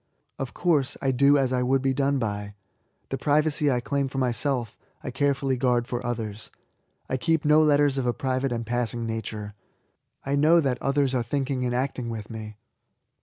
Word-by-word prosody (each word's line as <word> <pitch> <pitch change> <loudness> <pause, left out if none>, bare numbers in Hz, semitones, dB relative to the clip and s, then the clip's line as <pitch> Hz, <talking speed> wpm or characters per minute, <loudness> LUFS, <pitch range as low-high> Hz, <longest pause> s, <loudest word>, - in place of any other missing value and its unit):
Of 135 -2 -5
course, 155 -7 +1
I 135 - +1
do 140 +3 +4
as 130 -2 +1
I 125 - +1
would 130 +1 +1
be 135 0 +2
done 140 +1 +1
by. 105 -4 -3 0.5
The 135 - -3
privacy 150 +3 +2
I 125 -2 +1
claim 140 +2 -1
for 135 - -7
myself, 125 -2 -1 0.3
I 130 - -4
care 140 +2 +1
fully 135 -1 -1
guard 125 -1 +1
for 120 0 -3
others. 110 -3 -4 0.6
I 130 - -1
keep 160 +1 0
no 150 +1 +6
letters 145 -2 +3
of 125 - -1
a - - +3
private 130 +1 -1
and 115 -1 -2
passing 120 0 -2
nature. 110 -2 -5 0.7
I 140 +1 0
know 155 +4 +5
that 130 -5 -1
others 140 -1 +1
are 125 - +1
thinking 130 +1 -2
and 120 0 -1
acting 125 -2 -2
with 110 -1 -6
me. 110 -1 -7
130 Hz, 190 wpm, -26 LUFS, 120-140 Hz, 0.7 s, no